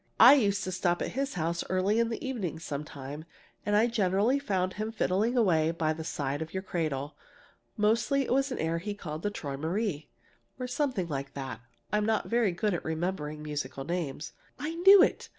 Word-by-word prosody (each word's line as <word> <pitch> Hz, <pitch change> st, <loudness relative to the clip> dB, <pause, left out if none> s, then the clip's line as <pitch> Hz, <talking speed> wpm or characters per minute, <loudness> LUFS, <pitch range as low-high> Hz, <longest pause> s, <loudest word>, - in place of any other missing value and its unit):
"I 245 Hz, +4 st, +11 dB
used 205 Hz, -7 st, +2 dB
to 185 Hz, -, -3 dB
stop 175 Hz, -1 st, 0 dB
at -, -, -2 dB
his 275 Hz, +2 st, -2 dB
house 170 Hz, 0 st, -1 dB
early 190 Hz, +4 st, +2 dB
in 230 Hz, -1 st, +2 dB
the 235 Hz, +3 st, -4 dB
evening 200 Hz, -11 st, -3 dB
sometimes, 145 Hz, -2 st, -6 dB, 0.4 s
and 205 Hz, -, +2 dB
I 215 Hz, +2 st, +5 dB
generally 220 Hz, +3 st, +2 dB
found 185 Hz, -8 st, -1 dB
him 215 Hz, +1 st, -3 dB
fiddling 220 Hz, +3 st, +1 dB
away 165 Hz, -8 st, +3 dB
by 160 Hz, -1 st, 0 dB
the 160 Hz, +1 st, -6 dB
side 145 Hz, -2 st, -3 dB
of 160 Hz, +3 st, -6 dB
your 190 Hz, -, -2 dB
cradle. 150 Hz, -6 st, -2 dB, 0.6 s
Mostly 230 Hz, +6 st, +2 dB
it -, -, -1 dB
was 275 Hz, +1 st, +1 dB
an -, -, -2 dB
air 165 Hz, +1 st, -1 dB
he 205 Hz, +4 st, -4 dB
called 155 Hz, -5 st, -6 dB
'Träumerei,' 160 Hz, 0 st, -2 dB, 0.5 s
or 255 Hz, -, -4 dB
something 250 Hz, -, -1 dB
like 140 Hz, -3 st, -5 dB
that. 130 Hz, -5 st, -5 dB, 0.3 s
I'm 210 Hz, 0 st, +2 dB
not 220 Hz, -1 st, +1 dB
very 230 Hz, -4 st, +2 dB
good 200 Hz, +4 st, 0 dB
at 175 Hz, -, -3 dB
remembering 160 Hz, -2 st, -3 dB
musical 145 Hz, -3 st, -4 dB
names." 155 Hz, -2 st, -4 dB, 0.2 s
"I 305 Hz, +2 st, -3 dB
knew 380 Hz, +3 st, +8 dB
it! -, -, 0 dB
185 Hz, 185 wpm, -29 LUFS, 155-225 Hz, 0.6 s, I